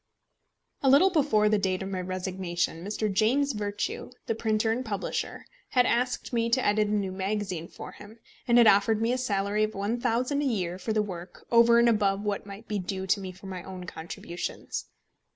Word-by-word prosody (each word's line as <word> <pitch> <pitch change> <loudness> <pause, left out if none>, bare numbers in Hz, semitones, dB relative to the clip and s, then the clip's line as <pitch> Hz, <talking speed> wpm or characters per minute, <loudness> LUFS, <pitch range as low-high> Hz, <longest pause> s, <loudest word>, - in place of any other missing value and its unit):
A 270 - +3
little 340 +9 +6
before 275 -11 +3
the 210 0 +3
date 190 -1 -1
of 190 - -5
my 185 -1 -2
resignation, 180 -2 -3
Mr. 210 +1 -2
James 255 +8 +2
Virtue, 205 -1 -3 0.2
the - - 0
printer 220 0 +1
and 245 +3 -1
publisher, 205 -5 -3 0.2
had 250 -1 +4
asked 250 +1 0
me 230 -1 +1
to 255 +2 +2
edit 210 0 +3
a - - -2
new 200 -3 0
magazine 190 -3 -3
for - - -9
him, 210 +2 -13 0.3
and 235 0 +5
had 240 - +8
offered 210 +1 +5
me 230 +2 +1
a - - 0
salary 205 -3 0
of 215 0 -1
£1000 240 +6 0
a - - 0
year 185 -9 -1
for 220 - -3
the 215 -1 +2
work, 180 -3 -8
over 235 0 +6
and 235 0 +5
above 205 -3 +2
what 205 -1 -2
might 200 +3 -10
be 210 -1 -1
due 190 +1 -4
to 195 +2 +2
me 190 -1 -6
for 185 +2 -15
my 185 -2 -5
own 185 0 -8
contributions. 170 0 -6
210 Hz, 200 wpm, -28 LUFS, 190-230 Hz, 0.3 s, had